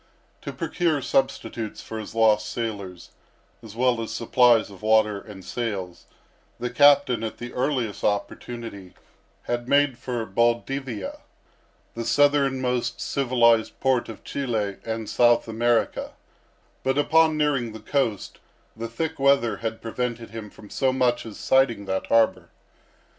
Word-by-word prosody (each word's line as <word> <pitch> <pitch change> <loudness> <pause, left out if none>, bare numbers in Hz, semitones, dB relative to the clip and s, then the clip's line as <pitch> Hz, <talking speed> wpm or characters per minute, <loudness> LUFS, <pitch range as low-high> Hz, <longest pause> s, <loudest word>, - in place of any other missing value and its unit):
To - - -5
procure 165 -3 -1
substitutes 115 -5 -1
for 110 - -6
his 110 +1 -8
lost 110 -2 +3
sailors, 100 -6 -5 0.5
as 110 -2 -12
well 120 -1 +2
as 115 - -5
supplies 120 -2 +3
of 95 - -13
water 110 -1 +3
and 95 -4 -12
sails, 100 -6 -4 0.5
the 120 0 -3
captain, 140 -3 +5
at 110 - -4
the 120 0 -8
earliest 125 -5 -1
opportunity, 100 -1 -4 0.5
had 120 +1 -3
made 140 -3 +3
for 120 -2 -3
Baldivia, 120 +2 -1 0.7
the 115 - -4
southernmost 130 -1 +1
civilized 120 -4 +2
port 130 -3 +1
of 110 - -9
Chili 110 -8 -2
and 110 -1 -4
South 120 +1 +3
America; 115 +1 0 0.7
but 135 +1 0
upon 160 +2 +4
nearing 140 -6 +1
the 110 - -9
coast 115 -8 -2 0.4
the 115 +1 -5
thick 160 +7 -4
weather 135 -6 +3
had 110 0 -5
prevented 115 -1 -4
him 110 -2 -7
from 105 0 -15
so 130 -1 +1
much 125 -2 +1
as 105 - -9
sighting 130 -6 +2
that 95 0 -2
harbor. 115 -1 +2
115 Hz, 135 wpm, -24 LUFS, 110-130 Hz, 0.7 s, captain